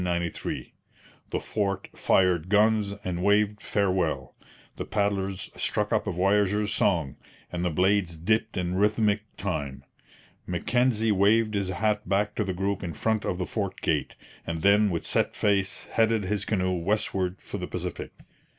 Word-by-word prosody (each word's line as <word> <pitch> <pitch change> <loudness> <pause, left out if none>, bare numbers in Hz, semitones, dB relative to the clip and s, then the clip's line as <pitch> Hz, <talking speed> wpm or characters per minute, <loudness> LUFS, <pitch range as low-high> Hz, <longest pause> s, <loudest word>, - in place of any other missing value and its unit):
The - - -1
fort 100 -2 -2
fired 90 -2 +2
guns 105 0 +3
and 90 -1 -3
waved 105 +1 +2
farewell; 90 -10 0 0.4
the - - -3
paddlers 100 -2 -1
struck - - 0
up - - +1
a - - 0
voyageurs' 105 +3 +2
song; 80 -9 +1 0.3
and 90 0 -3
the 90 - +1
blades 90 0 +1
dipped 110 +7 0
in 90 -1 -1
rhythmic 105 +1 +2 0.2
time. 70 -9 -3 0.6
Mackenzie 115 +5 +1
waved 105 +3 +3
his 100 -2 -1
hat 105 +1 -1
back 100 +1 +1
to 105 - -1
the 95 - -2
group 95 +2 -2
in 85 -2 -4
front 110 +6 0
of 90 - -1
the 90 - -2
fort 100 -2 -3
gate; 75 -3 -1 0.3
and 80 -1 -3
then 105 +1 +5
with 85 -3 -3
set - - 0
face 100 -2 +1
headed 115 -1 +1
his 100 +1 -1
canoe 95 -3 0
westward 95 -1 -1
for - - -7
the - - -4
Pacific. - - -5
100 Hz, 150 wpm, -27 LUFS, 90-105 Hz, 0.6 s, then